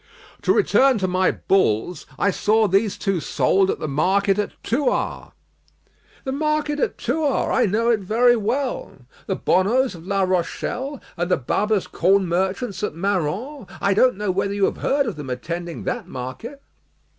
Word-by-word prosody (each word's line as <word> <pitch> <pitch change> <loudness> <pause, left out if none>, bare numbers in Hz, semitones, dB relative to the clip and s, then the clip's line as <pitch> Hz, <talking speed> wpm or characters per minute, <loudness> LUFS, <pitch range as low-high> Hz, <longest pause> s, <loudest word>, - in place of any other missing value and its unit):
"To - - +2
return 265 -2 +4
to 190 -2 -1
my 185 +1 +2
bulls; 175 - 0
I 200 - +2
saw 215 +3 +2
these 195 +2 +1
two 195 -3 -1
sold 190 +5 +1
at - - 0
the 155 - -4
market 195 +7 +1
at 210 - -1
Thouars." 275 +5 -1 0.9
"The 265 - -3
market 300 +1 -1
at - - -1
Thouars; 285 +2 0
I - - +3
know 230 +4 +1
it 225 - +2
very 235 +5 +3
well. 245 +5 -2 0.3
The 190 - 0
Bonneaus 235 +10 +2
of 170 0 -12
La 195 -1 +1
Rochelle, 235 - -2 0.2
and 175 +1 -1
the 180 - +3
Babas 205 - 0
corn 190 +2 +2
merchants 190 +4 -1
at 210 - -3
Marans, 200 - -2
I 200 - +2
don't 250 +1 +3
know 210 -2 -1
whether 195 +2 -1
you 200 -1 +2
have - - -2
heard 280 +1 +1
of 220 -9 -4
them 145 -3 -7
attending 170 +7 -5
that 240 -3 -3
market." 130 - -7
200 Hz, 170 wpm, -22 LUFS, 185-245 Hz, 0.9 s, return